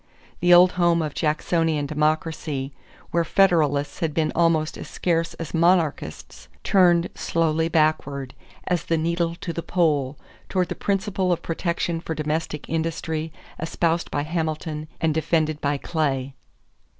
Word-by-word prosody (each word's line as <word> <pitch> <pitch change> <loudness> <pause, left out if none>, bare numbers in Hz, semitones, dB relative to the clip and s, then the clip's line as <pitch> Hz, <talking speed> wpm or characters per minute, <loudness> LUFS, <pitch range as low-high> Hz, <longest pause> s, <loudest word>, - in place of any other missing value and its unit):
The 175 +1 +3
old 180 +1 +8
home 170 -1 +4
of 150 -2 -4
Jacksonian 155 -1 0
democracy, 150 -2 -1 0.4
where 170 0 +2
Federalists 160 -6 +2
had 160 -3 -1
been 155 -1 +1
almost 165 -2 +2
as - - -8
scarce 165 -2 -1
as 165 -3 -7
monarchists, 160 - 0 0.2
turned 175 -3 +4
slowly 165 -1 0
backward, 145 -5 0 0.3
as 175 -3 -1
the 165 - +1
needle 170 +1 0
to 170 0 -5
the 170 - -3
pole, 150 -6 +1 0.3
toward 185 -2 0
the - - -1
principle 195 -2 -1
of 175 - -1
protection 170 0 -2
for 160 - -4
domestic 155 0 -3
industry, 160 0 -2 0.3
espoused 165 +1 0
by 145 - -1
Hamilton 155 -1 -3
and 160 -1 +1
defended 155 -1 0
by 145 0 0
Clay. 140 -4 -1
160 Hz, 140 wpm, -24 LUFS, 150-170 Hz, 0.4 s, old